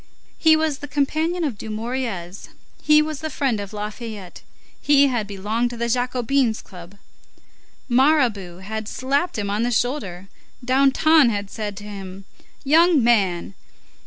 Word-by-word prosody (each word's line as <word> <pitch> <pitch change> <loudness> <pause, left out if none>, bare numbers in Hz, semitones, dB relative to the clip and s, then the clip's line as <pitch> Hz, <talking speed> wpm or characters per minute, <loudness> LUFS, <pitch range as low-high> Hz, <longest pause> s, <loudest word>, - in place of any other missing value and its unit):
He 320 -1 +6
was 315 -3 -1
the 290 - -7
companion 310 +5 -1
of 255 -10 -3
Dumouriez, 215 -5 -5 0.3
he 300 0 +5
was 305 -2 -5
the 315 - -4
friend 265 -6 -1
of 200 -1 -6
Lafayette; 210 -2 -7 0.4
he 285 -1 +4
had 235 -5 -2
belonged 210 +4 -2
to 240 - -8
the 235 0 -2
Jacobins' 250 0 0
club; 180 +1 -13 0.9
Mirabeau 240 - +2
had 220 +2 -5
slapped 280 +8 -1
him 200 -1 -2
on 210 +2 -1
the 240 - +1
shoulder; 220 -7 -2 0.4
Danton 275 +2 +4
had 205 -2 -4
said 210 -3 -5
to 205 - -8
him: 195 -2 -9 0.4
"Young 320 0 +4
man!" 200 -7 +1
235 Hz, 140 wpm, -22 LUFS, 205-280 Hz, 0.9 s, He